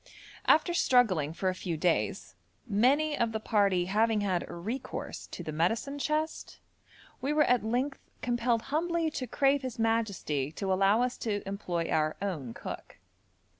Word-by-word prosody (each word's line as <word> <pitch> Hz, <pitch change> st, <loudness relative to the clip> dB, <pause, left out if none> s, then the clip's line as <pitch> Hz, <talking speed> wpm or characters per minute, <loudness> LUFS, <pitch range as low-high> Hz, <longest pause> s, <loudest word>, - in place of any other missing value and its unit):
After 320 Hz, +3 st, +5 dB
struggling 215 Hz, -, +3 dB
for 185 Hz, +3 st, -3 dB
a -, -, 0 dB
few 180 Hz, -3 st, -4 dB
days, 170 Hz, +1 st, 0 dB, 0.3 s
many 265 Hz, +8 st, +3 dB
of 230 Hz, -4 st, 0 dB
the 220 Hz, -, -1 dB
party 200 Hz, -5 st, +2 dB
having 215 Hz, +3 st, +2 dB
had 185 Hz, -4 st, 0 dB
recourse 220 Hz, +10 st, -5 dB
to -, -, -7 dB
the 155 Hz, -, -4 dB
medicine 225 Hz, -, 0 dB
chest, 310 Hz, +2 st, -2 dB, 0.6 s
we 275 Hz, -, 0 dB
were 300 Hz, 0 st, +4 dB
at 250 Hz, -5 st, +3 dB
length 250 Hz, +5 st, -1 dB, 0.2 s
compelled 240 Hz, -1 st, +1 dB
humbly 335 Hz, 0 st, +1 dB
to 255 Hz, -3 st, -4 dB
crave 275 Hz, +3 st, +2 dB
his 255 Hz, -2 st, -5 dB
majesty 205 Hz, -, 0 dB
to 190 Hz, +1 st, -1 dB
allow 195 Hz, +5 st, +4 dB
us 250 Hz, 0 st, -2 dB
to 205 Hz, -3 st, -2 dB
employ 180 Hz, -4 st, -2 dB
our 155 Hz, 0 st, +1 dB
own 160 Hz, -12 st, -4 dB
cook. -, -, -8 dB
225 Hz, 155 wpm, -30 LUFS, 185-260 Hz, 0.6 s, After